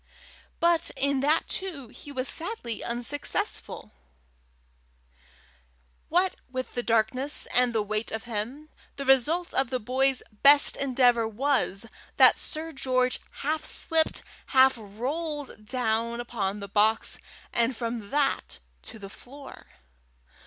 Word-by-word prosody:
But 340 -1 +3
in 280 0 +1
that 300 +4 +2
too 315 -11 -4
he 290 - -11
was 260 -1 -3
sadly 325 - -2
unsuccessful: 240 +5 -3 2.2
what 360 +3 +1
with 255 0 -5
the 245 - -1
darkness 235 +5 +1
and 250 0 +3
the 220 -2 0
weight 215 +2 -2
of 220 0 -4
him, 240 +7 -5 0.3
the 275 - -5
result 285 +7 +3
of 265 -2 +1
the 255 - 0
boy's 260 +3 +1 0.2
best 285 +1 +7
endeavour 245 -4 +2
was, 230 -3 0 0.3
that - - +7
Sir 320 +1 -4
George 255 -3 0 0.2
half 310 +2 0
slipped, 320 -1 0 0.2
half 265 -1 +6
rolled 255 +3 -5
down 235 -1 0
upon 210 -4 -3
the 200 - -6
box, 215 +3 +2 0.3
and 235 +2 +1
from 230 -3 -4
that 275 - 0 0.2
to - - -12
the 200 -2 -9
floor. 275 +7 -13
255 Hz, 125 wpm, -27 LUFS, 230-285 Hz, 2.2 s, best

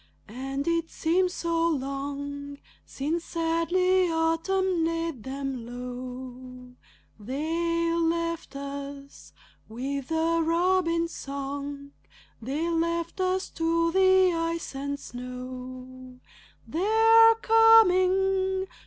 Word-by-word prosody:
And 270 +6 -5
it 335 -1 0
seems 360 +3 +1
so 335 0 0
long 285 0 -4 0.3
Since 315 +5 -3
sadly 350 +2 +1
autumn 330 +2 +1
laid 330 -5 -2
them 270 0 -5
low. 250 +1 -8 0.5
They 330 +8 -1
left 335 -2 -1
us 280 0 -8 0.4
with 265 +4 -4
the 325 +1 +1
robin's 335 0 +1
song, 280 +1 -6 0.5
They 285 +8 -2
left 335 +1 -1
us 370 +1 -1
to 335 0 +1
the 375 0 +4
ice 330 -1 -3
and 280 +1 -4
snow. 255 0 -9 0.5
They're 450 +5 +5
coming! 385 -4 +4
325 Hz, 90 wpm, -27 LUFS, 275-340 Hz, 0.5 s, They're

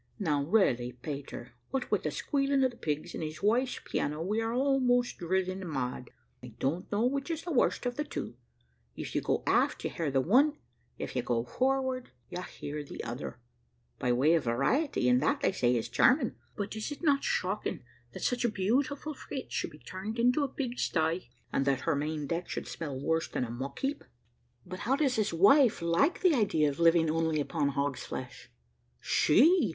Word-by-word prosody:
Now 150 -8 +1
really, 130 - +2
Peter, 125 -2 -7 0.2
what 265 -1 -3
with - - +2
the - - -1
squealing 275 -1 +1
of 260 - +3
the 240 - -16
pigs 155 +2 -3
and - - -5
his 155 +1 -6
wife's 245 +5 +2
piano 150 +1 -2
we 210 +5 0
are 225 0 -1
almost 250 -1 +2
driven 185 +2 -1
mad. 125 -3 -3 0.3
I 125 -3 -11
don't 145 +9 -2
know 210 +3 +2
which 275 +4 -1
is 330 -1 -3
the 345 - -4
worst 260 -2 +2
of 245 +1 -2
the 300 - 0
two; 290 - -6 0.6
if - - -6
you - - +1
go - - 0
aft - - +2
you - - -2
hear 165 -3 -2
the 135 -1 +2
one, 270 - +4 0.4
if - - -5
you 125 - +1
go 120 -1 0
forward 260 - 0 0.2
you, 180 0 -4
hear 150 -3 -6
the 140 - -8
other, 120 +3 -5 0.6
by 125 - +1
way 135 +7 +4
of 165 -5 +2
variety, 135 - +1
and 125 0 +4
that, 155 - +1
they - - +3
say, 125 -9 +2
is 115 - -1
charming. 250 -2 +3 0.2
But, 205 +1 -4
is 220 +6 -4
it 290 - -7
not 280 -3 +3
shocking - - -1 0.3
that - - -7
such 245 -1 0
a 240 - +3
beautiful 265 +9 0
frigate 270 -1 -7
should - - -2
be 150 - -14
turned 190 +8 -6
into 250 +5 +3
a - - +1
pig 255 -2 -4
sty, 160 -2 0 0.2
and 135 - +2
that 140 -2 +1
her 165 - +1
main 150 +1 -2
deck 170 +4 -3
should - - -4
smell 145 -5 -5
worse 160 +4 0
than 125 - -2
a 115 - -7
muck 130 +4 -5
heap?" 275 +2 -2 0.6
"But 185 +1 -7
how 235 +6 +1
does 275 -4 +1
his 215 -1 +1
wife 210 - +5
like 170 - +2
the 365 -3 +5
idea 195 - +2
of 140 - -6
living 165 -1 +5
only 160 -1 +1
upon 145 0 0
hog's 140 -1 -1
flesh?" 125 -1 -7 0.5
"She! 300 - +4
185 Hz, 200 wpm, -30 LUFS, -, 0.6 s, wife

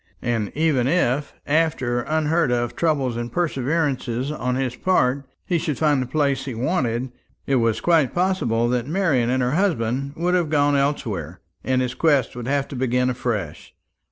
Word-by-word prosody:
And 115 -4 -1
even 150 -6 +2
if, 145 -3 0
after 145 -6 +1
unheard 155 0 +1
of 120 -1 -1
trouble 140 -7 0
and 120 0 -5
perseverance 150 -4 0 0.2
on 125 -4 -2
his 130 -2 -2
part, 140 -6 +1 0.2
he 175 -2 0
should 155 -4 -2
find 150 -4 +2
the 130 - -3
place 140 -1 0
he 130 -4 -5
wanted, 125 -2 -1 0.3
it 135 - +2
was 115 -2 +1
quite 160 -4 +3
possible 175 -11 +1
that 125 0 -1
Marian 150 -9 +1
and 130 0 +1
her 125 - 0
husband 140 - 0
would 175 +2 0
have 175 -4 +1
gone 145 -1 +3
elsewhere, 110 - -2 0.2
and 130 0 +1
his 125 0 -3
quest 145 -7 +2
would 120 -1 -6
have 140 0 0
to - - -7
begin 125 0 +1
afresh. 110 -10 -4
135 Hz, 170 wpm, -22 LUFS, 120-155 Hz, 0.3 s, quite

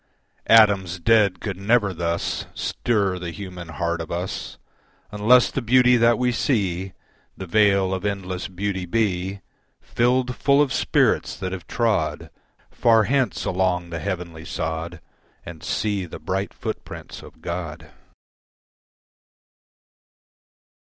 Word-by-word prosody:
Atoms 100 -5 +5
dead 105 -1 +3
could 100 -4 -4
never 100 0 +2
thus 85 0 -2
Stir 100 -6 0
the 90 -1 -5
human 90 -1 -8
heart 85 +1 -2
of 80 - -7
us 90 +2 -4 0.5
Unless 115 +4 +4
the 135 - -2
beauty 125 +1 +5
that 115 -1 +4
we 125 0 +1
see 95 -7 -1 0.4
The 95 - -6
veil 100 0 +3
of 95 0 -3
endless 95 -3 -3
beauty 95 -1 -3
be, 95 -1 -1 0.4
Filled 125 +1 0
full 140 0 +3
of 145 -3 +2
spirits - - +1
that 95 -1 -4
have 90 -3 -7
trod 95 -11 -1 0.4
Far 115 -2 +4
hence 130 +4 0
along 90 -2 0
the 85 - -3
heavenly 85 -3 -5
sod 80 +1 -4 0.4
And 85 -2 -9
see 100 -4 -2
the - - -8
bright 95 +1 -3
footprints - - -7
of - - -15
God. 85 -2 -5
95 Hz, 125 wpm, -23 LUFS, 85-110 Hz, 0.5 s, Atoms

